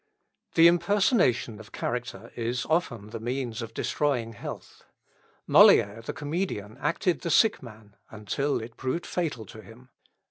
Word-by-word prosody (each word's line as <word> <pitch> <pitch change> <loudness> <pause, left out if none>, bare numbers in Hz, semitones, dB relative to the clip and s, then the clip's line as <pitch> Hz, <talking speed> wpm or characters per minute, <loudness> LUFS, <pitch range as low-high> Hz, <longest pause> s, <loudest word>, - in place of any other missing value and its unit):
The 165 - +7
impersonation 170 - +2
of 110 +1 -13
character 120 -2 -5
is 120 +2 -2
often 120 - -1
the 115 - -5
means 120 0 -3
of 115 -1 -6
destroying 125 -6 -1
health. 100 - -9 0.6
Molière, 105 +3 +6
the - - -4
comedian, 145 - -4
acted 175 +1 0
the 170 - -3
sick 220 +8 +4
man 110 -3 -13
until 110 +7 -2
it 115 +1 -10
proved 135 +7 -3
fatal 150 -11 -3
to 110 - -12
him. 115 +5 -16
120 Hz, 140 wpm, -27 LUFS, 110-155 Hz, 0.6 s, The